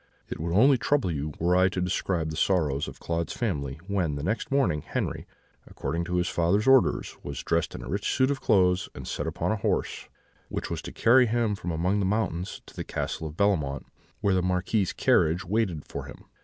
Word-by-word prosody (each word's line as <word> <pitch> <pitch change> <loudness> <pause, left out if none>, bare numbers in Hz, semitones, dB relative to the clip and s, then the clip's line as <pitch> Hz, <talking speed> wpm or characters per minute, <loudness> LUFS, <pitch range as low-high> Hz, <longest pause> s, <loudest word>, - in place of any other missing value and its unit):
"It - - -5
would 85 +2 -2
only 125 +8 +5
trouble 140 -10 +1
you 75 0 -3
were 85 +2 +2
I 95 +1 +5
to 95 - -3
describe 90 -2 -1
the - - -5
sorrow 80 -5 +2
of 70 - -5
Claude's 85 -1 -2
family 70 0 -2
when, 95 -7 -1
the 70 - -5
next 110 +7 -1
morning, 95 - +2
Henri, - - -3 0.4
according 85 +1 -3
to 90 +1 -2
his 90 0 +1
father's 90 +6 +1
orders, 135 -1 +3
was 70 -2 -6
dressed 85 -1 0
in - - -7
a - - -8
rich 100 +3 -1
suit 130 +1 +2
of 140 - -3
clothes, 95 -4 +3
and - - -8
set 75 - -3
upon 80 +6 -1
a 110 - 0
horse, - - -2 0.4
which - - -4
was - - -3
to - - -7
carry 120 +2 +5
him 115 -1 +1
from 90 -3 -5
among 90 +5 0
the 100 - +1
mountains 95 -4 -2
to - - -15
the - - -4
Castle 80 - -3
of 75 +1 -10
Bellemont, 75 -10 +1 0.4
where 100 -2 +2
the 95 - +2
Marquis's 90 +2 0
carriage 85 +3 +2
waited 95 -5 -1
for - - -6
him. - - -12
90 Hz, 210 wpm, -27 LUFS, 80-105 Hz, 0.4 s, only